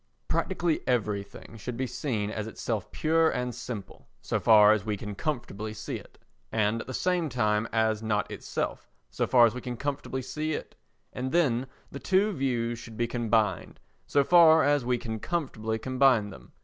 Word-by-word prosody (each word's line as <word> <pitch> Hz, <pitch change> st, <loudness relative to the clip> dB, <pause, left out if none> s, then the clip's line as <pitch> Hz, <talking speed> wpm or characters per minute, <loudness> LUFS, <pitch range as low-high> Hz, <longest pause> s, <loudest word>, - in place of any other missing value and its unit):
Practically 175 Hz, -4 st, 0 dB
everything 105 Hz, -2 st, -2 dB
should 115 Hz, +3 st, -6 dB
be 130 Hz, -, -1 dB
seen 110 Hz, -6 st, -2 dB
as 110 Hz, 0 st, -4 dB
itself 110 Hz, -2 st, -4 dB
pure 160 Hz, +1 st, +2 dB
and 125 Hz, -3 st, -2 dB
simple, 120 Hz, -4 st, -8 dB
so -, -, -2 dB
far 105 Hz, -2 st, +7 dB
as 105 Hz, -3 st, -1 dB
we 105 Hz, -1 st, -2 dB
can 105 Hz, +1 st, -6 dB
comfortably 110 Hz, -5 st, -4 dB
see -, -, -5 dB
it, -, -, -15 dB, 0.3 s
and 110 Hz, +1 st, +1 dB
at -, -, -10 dB
the -, -, -5 dB
same 175 Hz, +3 st, 0 dB
time 110 Hz, -3 st, +1 dB
as 110 Hz, -1 st, +1 dB
not 105 Hz, -2 st, -1 dB
itself, -, -, -4 dB, 0.2 s
so -, -, -1 dB
far 120 Hz, -2 st, +6 dB
as 115 Hz, -, +1 dB
we 125 Hz, -, -6 dB
can 125 Hz, -1 st, -5 dB
comfortably 135 Hz, -1 st, -3 dB
see 155 Hz, +4 st, -3 dB
it, -, -, -6 dB, 0.4 s
and 130 Hz, +1 st, -3 dB
then 135 Hz, -7 st, +2 dB, 0.2 s
the 140 Hz, -, -7 dB
two 195 Hz, +6 st, +2 dB
views 120 Hz, -, -1 dB
should 115 Hz, -2 st, -11 dB
be 120 Hz, -, +1 dB
combined, 115 Hz, -5 st, 0 dB, 0.3 s
so 140 Hz, -, +3 dB
far 160 Hz, 0 st, +7 dB
as 145 Hz, -2 st, +2 dB
we 125 Hz, 0 st, +1 dB
can 110 Hz, -2 st, -5 dB
comfortably 110 Hz, -8 st, -2 dB
combine 130 Hz, -3 st, +2 dB
them. -, -, -14 dB
120 Hz, 180 wpm, -28 LUFS, 110-140 Hz, 0.4 s, far